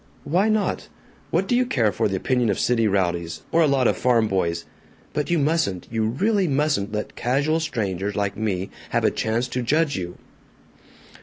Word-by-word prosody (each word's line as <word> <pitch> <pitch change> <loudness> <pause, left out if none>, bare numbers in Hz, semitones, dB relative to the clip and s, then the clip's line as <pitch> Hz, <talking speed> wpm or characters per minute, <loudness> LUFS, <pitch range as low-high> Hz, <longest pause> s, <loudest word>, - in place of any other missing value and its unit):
"Why 185 +8 +2
not? 215 -1 0 0.4
What - - +1
do 245 - +2
you 250 - +4
care 120 - +1
for - - 0
the 95 - -2
opinion 125 +4 +1
of 100 - +1
city 115 -2 +2
rowdies, 85 -4 -1
or 165 - +4
a 160 - +5
lot 135 -3 +3
of - - +2
farm 115 -3 +2
boys? 85 -4 -1 0.5
But 150 - -2
you 170 - +2
mustn't, 145 - 0
you 110 -1 0
really 195 - +1
mustn't, 140 -8 0
let 105 0 -4
casual 140 +6 +1
strangers 105 - -2
like 100 -1 -1
me 100 -3 -2 0.2
have - - 0
a - - +3
chance 115 +3 -1
to 125 - -2
judge 150 +4 +1
you." 90 -1 -5
120 Hz, 185 wpm, -23 LUFS, 100-150 Hz, 0.5 s, a